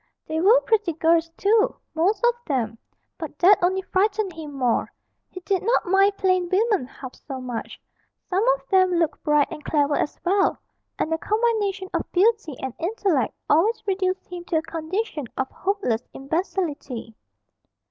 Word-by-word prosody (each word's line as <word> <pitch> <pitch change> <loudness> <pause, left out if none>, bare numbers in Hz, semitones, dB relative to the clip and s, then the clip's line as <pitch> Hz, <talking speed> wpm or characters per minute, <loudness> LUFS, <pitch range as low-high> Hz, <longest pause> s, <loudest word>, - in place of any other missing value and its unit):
They 315 +1 -2
were 440 +7 +6
pretty 425 -6 +1
girls 330 +1 +2
too, 430 +2 +3 0.2
most 370 +9 +1
of 480 - +5
them, 230 -5 -1 0.4
but 315 -3 -7
that 375 +4 +5
only 375 +2 +1
frightened 400 0 0
him 315 -2 -8
more; 255 -4 0 0.4
he 370 - -9
did 380 0 0
not 465 +5 +1
mind 390 +2 +3
plain 370 -2 +1
women 405 - +2
half 260 -1 -10
so 270 -3 -8
much; 250 -3 -6 0.5
some 380 +3 +1
of - - -17
them 370 -2 +4
looked 325 -3 0
bright 295 -2 +3
and 300 - -8
clever 290 -1 +1
as 295 - -1
well, 390 +2 +2 0.4
and 320 - -1
a 325 - -1
combination 425 -3 0
of - - -2
beauty 400 - +2
and 265 -2 -3
intellect 345 - 0
always 425 +9 +2
reduced 375 -1 -1
him 355 -1 -8
to 340 - -2
a 315 - 0
condition 325 - -3
of 265 - -2
hopeless 380 - -1
imbecility. 290 - -3
360 Hz, 160 wpm, -24 LUFS, 300-400 Hz, 0.5 s, were